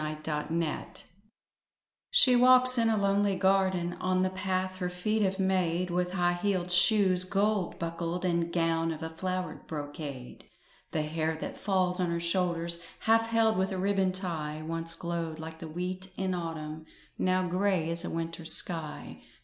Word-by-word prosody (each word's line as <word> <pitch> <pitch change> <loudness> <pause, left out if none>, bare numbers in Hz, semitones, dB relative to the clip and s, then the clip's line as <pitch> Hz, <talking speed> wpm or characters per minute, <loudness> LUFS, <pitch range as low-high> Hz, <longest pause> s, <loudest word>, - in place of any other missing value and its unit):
THE 155 - -2
OLD 150 - -4
MAID 165 -1 -3 1.1
She 280 - +5
walks 255 0 +6
in 230 -1 +3
a 220 - +2
lonely 200 0 +2
garden 190 -2 +2
On 185 0 +1
the 185 - 0
path 185 0 -2
her 180 -1 -2
feet 215 +5 -1
have 190 -1 +1
made, 185 -2 +1
With 180 +1 -1
high 175 -1 +1
heeled 185 -3 0
shoes, 185 0 +4
gold 200 0 0
buckled, 170 +2 -3
And 170 -1 0
gown 165 -1 +1
of 160 0 -6
a 160 - -4
flowered 185 +2 -4
brocade; 145 -4 -7 0.4
The 155 - -1
hair 160 +1 -1
that - - -5
falls 185 -2 +1
on 180 -1 +1
her 170 0 -1
shoulders, 170 -1 -1 0.2
Half 225 0 +3
held 225 -2 +2
with 190 +1 0
a 190 - -2
ribbon 195 0 +1
tie, 160 -5 -4
Once 165 0 -3
glowed 170 -2 -4
like 160 0 -8
the 165 - -7
wheat 180 +3 -4
in 190 -1 -1
autumn, 160 -2 -5 0.3
Now 185 0 +1
grey 180 -2 +1
as 170 +1 -1
a - - -4
winter 165 0 -4
sky. 160 -1 +1
180 Hz, 165 wpm, -29 LUFS, 165-190 Hz, 1.1 s, walks